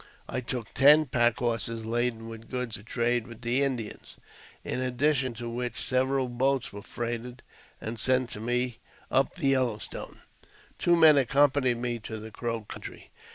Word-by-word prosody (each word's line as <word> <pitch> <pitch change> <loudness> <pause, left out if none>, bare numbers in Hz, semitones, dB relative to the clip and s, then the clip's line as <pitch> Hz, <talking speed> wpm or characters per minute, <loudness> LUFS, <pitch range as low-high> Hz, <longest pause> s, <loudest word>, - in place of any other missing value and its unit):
I 130 - -3
took 120 -3 -5
ten 150 +3 +7
pack 120 -3 +2
horses 115 -1 -2
laden 115 0 -1
with 115 0 -10
goods 125 -3 -3
to - - -12
trade 120 +1 0
with 120 -1 -11
the 120 +3 +1
Indians, 125 -6 -3 0.5
in 125 - -2
addition 130 0 +1
to 120 +1 -6
which 120 +1 -3
several 130 +1 +1
boats 130 +1 0
were 100 - -7
freighted 120 +2 -5 0.4
and 110 +1 -5
sent 130 +1 +2
to - - -6
me 120 +1 -1 0.3
up 135 +1 +2
the 150 -7 +1
Yellow 130 -5 +2
Stone. - - -9 0.6
Two 175 - +4
men 160 -3 +7
accompanied 135 -1 +3
me 120 -1 -2
to 110 +1 -6
the 110 +1 -9
Crow 115 0 -3
country. 105 - -10
120 Hz, 165 wpm, -28 LUFS, 115-130 Hz, 0.6 s, ten